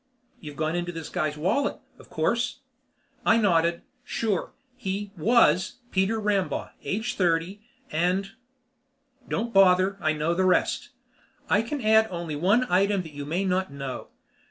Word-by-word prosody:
"You've 150 -2 -9
gone 155 +3 -1
into 175 0 -2
this 165 -2 -7
guy's 155 -1 -2
wallet, 190 - 0 0.2
of - - -16
course?" - - -1 0.6
I 225 - +4
nodded. 170 -5 +2 0.2
"Sure. 220 -6 -2 0.2
He 200 -4 -4
was 190 -1 +3 0.2
Peter 195 +4 +1
Rambaugh, 205 -3 -1
age 225 +6 -2
thirty, 180 +1 0 0.3
and 180 +5 0 0.5
" 270 0 -32
"Don't 230 +1 -2
bother. 190 0 +5
I 155 - +2
know 155 +2 0
the 185 +2 +1
rest. 185 - +1 0.6
I 210 - +5
can 265 +5 -4
add 220 0 +5
only 170 -4 -4
one 200 +11 +3
item 195 0 +2
that 160 -3 -11
you 145 0 -6
may 175 +6 -1
not 185 -3 0
know. 135 -2 -6
190 Hz, 150 wpm, -26 LUFS, 165-215 Hz, 0.6 s, bother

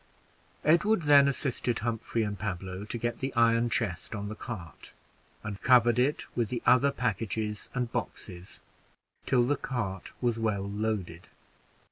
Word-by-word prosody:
Edward 175 +5 +4
then 145 -1 +7
assisted 125 -3 -1
Humphrey 115 0 -1
and 105 -1 -3
Pablo 95 -1 -4
to 110 - -4
get 120 +1 -2
the 135 +1 -2
iron 115 0 +4
chest 110 -2 -2
on 105 0 -4
the 110 - -5
cart, 95 -7 -8 0.5
and 105 -2 -6
covered 120 -2 +5
it 145 +5 +1
with 115 -4 0
the 120 - -3
other 135 +2 +5
packages 110 -2 -2
and 125 -2 -1
boxes, 90 +1 -5 0.7
till 125 -2 +4
the 140 +4 +2
cart 100 -9 -4
was 120 -2 0
well 105 -3 0
loaded. 100 -5 -3
115 Hz, 145 wpm, -29 LUFS, 105-125 Hz, 0.7 s, then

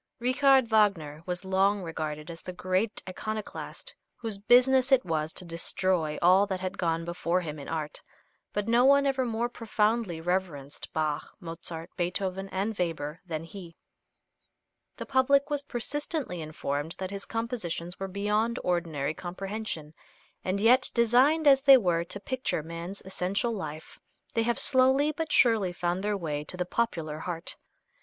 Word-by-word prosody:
Richard 260 +1 +4
Wagner 195 -9 +2
was 180 +1 -3
long 195 +1 +2
regarded 155 -1 -5
as 165 - -10
the 180 - -7
great 185 +4 -1
iconoclast 215 +3 -5 0.2
whose 220 -4 -4
business 255 +4 +4
it 265 -2 +5
was 160 -2 -1
to 185 - -5
destroy 170 -1 0
all 185 +3 +6
that 190 -2 -2
had 185 +1 -5
gone 165 -1 0
before 170 +1 -1
him 155 -3 -6
in 140 - -8
art, 155 -2 -4 0.5
but 205 0 -2
no 235 +2 +4
one 280 +1 +5
ever 265 -2 +1
more 230 +1 -1
profoundly 220 -5 0
reverenced 165 -5 -3
Bach, 155 -1 -2
Mozart, 165 -1 -7
Beethoven 190 +2 -2
and 200 +4 -2
Weber 160 -3 -2
than 160 -2 -4
he. 170 -1 -10 1.2
The - - -5
public 280 +2 +3
was 290 -1 +1
persistently 280 - -3
informed 155 0 -3
that 190 0 -4
his 200 0 -6
compositions 220 -7 -4
were 195 - -3
beyond 210 +4 0
ordinary 160 -5 -1
comprehension, 185 -2 -5 0.5
and 185 +2 -1
yet 250 +5 +5
designed, 255 +7 +4
as 270 -2 +7
they 275 -1 +9
were, 175 -7 +1
to 200 - -6
picture 255 - -2
man's 170 +4 -7
essential 190 +5 -1
life, 155 -6 -7 0.3
they 230 - +2
have 235 +1 0
slowly 265 +2 +6
but 315 0 -4
surely 220 -7 +4
found 175 +1 -2
their 210 0 0
way 150 -5 -3
to 180 - -3
the 180 - -1
popular 165 -8 -2
heart. 170 0 -4
190 Hz, 155 wpm, -28 LUFS, 165-235 Hz, 1.2 s, they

